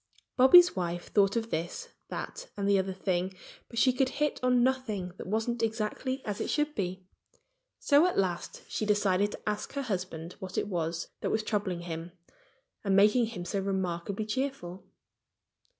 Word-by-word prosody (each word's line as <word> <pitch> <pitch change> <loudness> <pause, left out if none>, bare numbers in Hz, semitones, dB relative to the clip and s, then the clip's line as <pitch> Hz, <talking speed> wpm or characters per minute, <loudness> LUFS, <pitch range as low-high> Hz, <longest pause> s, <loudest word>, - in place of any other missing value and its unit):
Bobby's 350 +8 +8
wife 175 -2 -3
thought 200 0 +4
of 230 0 -2
this, 175 - -3 0.2
that - - -6
and 200 -1 -1
the 200 -1 +4
other 190 0 -1
thing. 185 0 -1 0.3
But 230 - -9
she 255 +2 +5
could 260 0 +2
hit 295 +2 -1
on 250 -1 +3
nothing 245 -8 0
that - - -7
wasn't 225 +3 -1
exactly 225 +4 -2
as 205 -2 -3
it - - -2
should 295 0 +1
be. 185 -3 -3 0.7
So 290 +4 +5
at 365 - -2
last 180 -3 -1
she - - -3
decided 205 -1 +2
to - - -8
ask 210 +4 -2
her 280 0 -2
husband 180 -6 -4
what 185 0 -7
it - - 0
was 165 -3 -2
that - - -2
was 220 0 0
troubling 200 -5 -1
him 170 0 -6 0.7
and 195 -2 +2
making 210 +4 +5
him 205 -6 -6
so 195 +3 -1
remarkably 190 +1 -2
cheerful. 215 -6 -4
205 Hz, 170 wpm, -30 LUFS, 185-250 Hz, 0.7 s, Bobby's